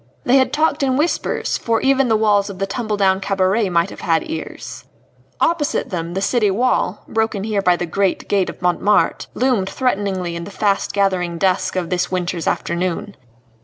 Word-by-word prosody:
They 255 +2 +4
had 260 - +3
talked 310 -1 +1
in 265 -2 +1
whispers, 315 +4 -1
for 230 -1 0
even 270 -1 +3
the 225 - +3
walls 205 -2 +2
of 195 - -7
the 195 - -1
tumble 215 +1 -3
down 190 -1 +3
cabaret 195 +2 +1
might 170 -1 +1
have - - -10
had 165 -1 +1
ears. 325 - -7 0.6
Opposite 320 -7 0
them 170 -1 -4
the 195 - -1
city 215 -1 +2
wall 210 -1 0
broken 220 -3 -1
here 210 -2 0
by 180 -2 +3
the 175 - -3
great 190 +3 -1
gate 195 -3 +1
of - - -10
Montmartre 190 +4 +2
loomed 240 -7 +1
threateningly 195 -8 -1
in 170 - -5
the - - -8
fast 200 0 0
gathering 185 -4 0
dusk 185 +1 +1
of 180 -2 -2
this 180 -1 0
winter's 180 -2 -2
afternoon. 180 +3 -2
200 Hz, 185 wpm, -19 LUFS, 185-225 Hz, 0.6 s, They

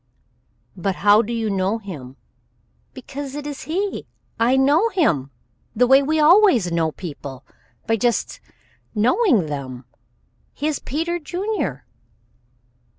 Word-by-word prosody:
"But 190 +1 -2
how 205 +3 +5
do 235 +1 -5
you 230 -2 -1
know 195 +3 0
him?" 150 - -9 0.8
"Because 280 0 -7
it 295 0 -6
is 290 -2 -6
he. 385 +5 -3 0.3
I 245 +3 +3
know 295 +11 +4
him 170 - +1 0.5
the 250 +3 +4
way 265 +2 +6
we 310 +3 0
always 305 - +5
know 165 -1 +1
people 140 -6 -8 0.4
by 225 - +1
just 240 +2 -1 0.6
knowing 240 - +3
them. 135 -4 -6 0.7
He 290 - -4
is 305 -1 0
Peter 330 +5 -2
Junior." 375 +7 -3
240 Hz, 125 wpm, -21 LUFS, 185-310 Hz, 0.8 s, way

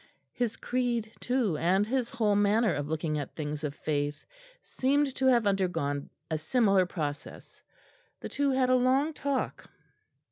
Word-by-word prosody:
His 240 -3 -2
creed 240 -3 -1
too, 245 -10 0
and 185 +6 +2
his 245 +1 -1
whole 210 -3 +1
manner 205 +1 +3
of 145 0 -3
looking 155 -1 -1
at 145 - -6
things 150 -1 -4
of 145 -1 -3
faith, 145 -1 -2 0.4
seemed 275 +1 +1
to 265 0 +1
have 240 -4 +4
undergone 180 -8 0 0.2
a 155 - 0
similar 195 +1 +3
process. 150 -5 -6 0.6
The - - -6
two 285 0 0
had 260 -1 +2
a - - +6
long 265 +5 +2
talk. 280 -3 -3
210 Hz, 150 wpm, -29 LUFS, 155-255 Hz, 0.6 s, a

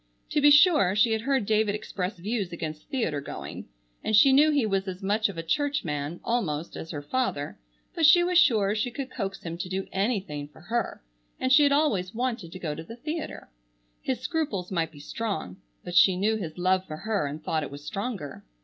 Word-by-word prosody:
To 295 - +2
be 290 - +7
sure, 290 - +6
she 220 +2 +4
had 220 -1 0
heard 265 -2 +1
David 215 -1 +2
express 195 -1 -4
views 200 0 -2
against 155 -2 -6
theatre 165 - -1
going, - - -7 0.4
and 220 - +1
she 265 +6 +7
knew 295 +3 +6
he 285 -6 +2
was 195 -2 0
as 185 +1 -6
much 210 +2 +1
of 190 - -8
a 165 - -3
church 285 - 0
man, 150 +2 -3
almost, 170 -10 -2
as 160 - -7
her 145 -3 -5
father, 145 - -2 0.3
but 325 -3 +4
she 350 +3 +7
was 355 0 +4
sure 215 - +4
she 220 +3 -1
could 260 +1 -6
coax 195 0 -4
him 170 0 -5
to 180 - -4
do 190 +1 -2
anything 190 -8 -1
for 150 - -18
her, 230 - -3 0.4
and 260 0 +2
she 300 - +8
had 285 -1 +5
always 225 -11 +1
wanted 230 -8 -2
to 185 - -7
go 165 -5 -3
to 160 - -7
the 225 +8 -10
theatre. 305 - -6 0.5
His 255 -2 -2
scruples 255 - -2
might 165 -3 0
be 145 - -14
strong, 150 - -4 0.3
but 175 - -7
she 180 +1 +6
knew 210 +4 +2
his 175 -7 -5
love 185 +1 +2
for 155 - -6
her, 210 -5 -1
and 150 +2 -7
thought 155 0 0
it 145 - -5
was 145 +1 -10
stronger. 195 - -5
200 Hz, 215 wpm, -27 LUFS, 170-255 Hz, 0.5 s, she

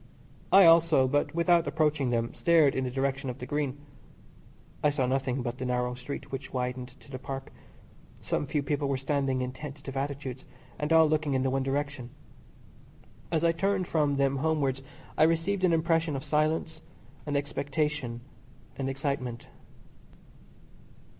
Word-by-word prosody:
I 195 -1 +8
also, 165 -5 +6
but 145 +4 0
without 170 0 +3
approaching 150 -4 +1
them, 115 -1 -1
stared 160 -5 +4
in 130 - -1
the - - -1
direction 135 +1 -1
of 125 - -5
the 125 - -7
Green. 145 0 -2 1.1
I 150 - +5
saw 140 -3 0
nothing 130 0 -1
but 120 0 -4
the 130 - -3
narrow 125 0 0
street 125 +3 -7
which 135 0 -6
widened 125 0 -4
to 140 - -16
the 130 - -5
Park. 135 +1 -7 0.7
Some 145 - -2
few 145 +1 -1
people 145 0 -1
were 135 - +1
standing 135 -1 0
in 125 - -3
tentative 140 0 -8
attitudes, 135 -2 -4 0.4
and 150 +1 -2
all 160 0 +7
looking 150 -2 0
in 130 - +1
the 130 - +1
one 135 +1 +1
direction. 135 -2 -2 1.2
As 160 0 +1
I 170 - +5
turned 190 +2 0
from 150 -3 +1
them 140 0 +1
homewards 140 -3 0 0.4
I - - +7
received 165 +4 0
an 180 - +4
impression 165 -1 +1
of 135 - -4
silence 155 +1 0 0.5
and 145 -1 0
expectation 145 -3 -2 0.6
and 135 -1 -1
excitement. 135 -3 -3
140 Hz, 160 wpm, -29 LUFS, 130-155 Hz, 1.2 s, I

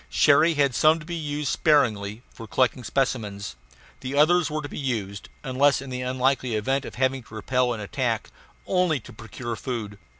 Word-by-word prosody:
Cherrie 150 - +4
had 140 -3 +2
some 155 +5 +4
to 150 - -11
be 175 - -6
used 150 -3 -3
sparingly 110 -8 +2
for 115 - -10
collecting 130 +2 +1
specimens. 105 - -2 0.4
The 135 +2 -4
others 170 +3 +4
were 155 0 -3
to - - -4
be - - -7
used 105 -8 -3
unless 135 +1 +3
in 135 -1 -8
the 125 0 -3
unlikely 130 -1 0
event 135 +6 0
of - - -8
having 130 +1 0
to 110 -1 -14
repel 125 +3 0
an 110 -3 -4
attack 100 - -2 0.3
only 180 -6 +1
to 110 - -13
procure 115 +2 -6
food. 110 -3 -5
130 Hz, 180 wpm, -25 LUFS, 110-145 Hz, 0.4 s, Cherrie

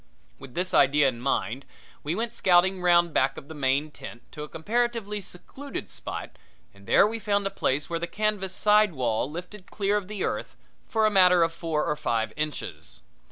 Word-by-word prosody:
With 135 -2 -12
this 180 +1 -1
idea 145 +1 +5
in 120 -2 -7
mind 130 0 -1 0.4
we 155 +4 -2
went 230 +2 -2
scouting 185 -3 +3
round 175 -2 +4
back 135 +1 +2
of - - -9
the - - -7
main 145 +1 0
tent 120 -3 -10
to 150 - -8
a 150 - -6
comparatively 220 +2 -1
secluded 265 +10 -8
spot, - - -6 0.3
and 100 0 -18
there - - +6
we 225 +2 -2
found 205 -2 0
a 195 - -1
place 145 -6 -1
where 170 -1 -2
the 170 - -3
canvas 210 -2 -1
side 210 -2 +4
wall 125 -2 -1
lifted 180 +5 -9
clear 205 0 0
of 200 -3 -4
the 210 -2 -4
earth - - -3 0.3
for 220 -2 +2
a 215 - +3
matter 180 -3 +6
of 165 0 0
four 165 -2 -2
or 150 - 0
five 115 -6 -1
inches. 150 - -5
175 Hz, 195 wpm, -26 LUFS, 145-205 Hz, 0.4 s, there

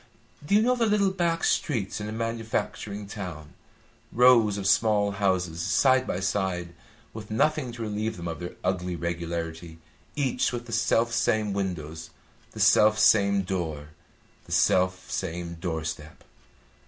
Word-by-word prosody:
Do 175 +7 +1
you 215 - +5
know 250 +2 +3
the 235 -2 +1
little 205 -2 +2
back 170 -3 -1
streets 105 - 0
in 105 - -4
a - - -5
manufacturing 110 -2 -3
town? 90 -7 -8 0.6
Rows 115 -4 +5
of 100 - -4
small 105 0 +3
houses, 95 -4 -1
side 130 +7 +3
by 90 - -2
side, 95 -3 -2 0.4
with 110 -1 -9
nothing 130 +4 +1
to 115 -1 -6
relieve 110 0 -3
them 85 0 -6
of 80 -1 -5
their 90 0 -7
ugly 90 -1 -1
regularity, 85 -1 -4 0.4
each 135 -4 0
with 120 -1 -5
the 120 - -10
self 115 +1 +2
same 110 -2 +1
windows, 80 -5 -4 0.4
the - - -9
self 110 0 +5
same 100 -2 +4
door, 80 -6 -4 0.6
the - - -14
self 95 0 +2
same 85 -1 -4
door 80 -3 -2
step. 80 -1 -7
100 Hz, 150 wpm, -26 LUFS, 85-115 Hz, 0.6 s, you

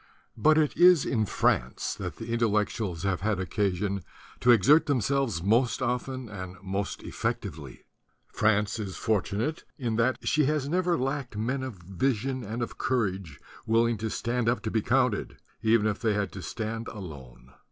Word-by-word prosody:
But 155 +7 +4
it 155 -2 +2
is 175 -3 +6
in 110 -4 0
France - - 0
that - - -5
the 115 +1 -5
Intellectuals 105 -5 0
have 95 -3 0
had 105 -1 0
occasion 95 +1 -1 0.4
to 125 - +1
exert 120 - +6
themselves 135 - 0
most 115 +5 +2
often 130 0 -2
and 95 -3 -7
most 95 +1 -3
effectively. 70 -5 -4 0.5
France 105 0 +2
is 100 -3 -5
fortunate 110 - -1
in 115 -5 -2
that 120 +3 +2
she 150 -1 +3
has 150 -1 0
never 175 +2 +1
lacked 135 -3 -3
men 130 +5 -1
of 130 -4 -5
vision 120 +8 -2
and 115 +3 -3
of - - -7
courage, 95 - -1 0.3
willing 115 +1 +3
to 110 +1 -2
stand 120 +1 -1
up 120 - 0
to 110 - -2
be 110 - +1
counted, 125 -2 +1 0.2
even 110 -1 +3
if 105 -2 0
they 110 -3 +1
had 100 -3 -1
to 95 - -8
stand 115 +3 -4
alone. 70 - -10
115 Hz, 165 wpm, -28 LUFS, 100-130 Hz, 0.5 s, is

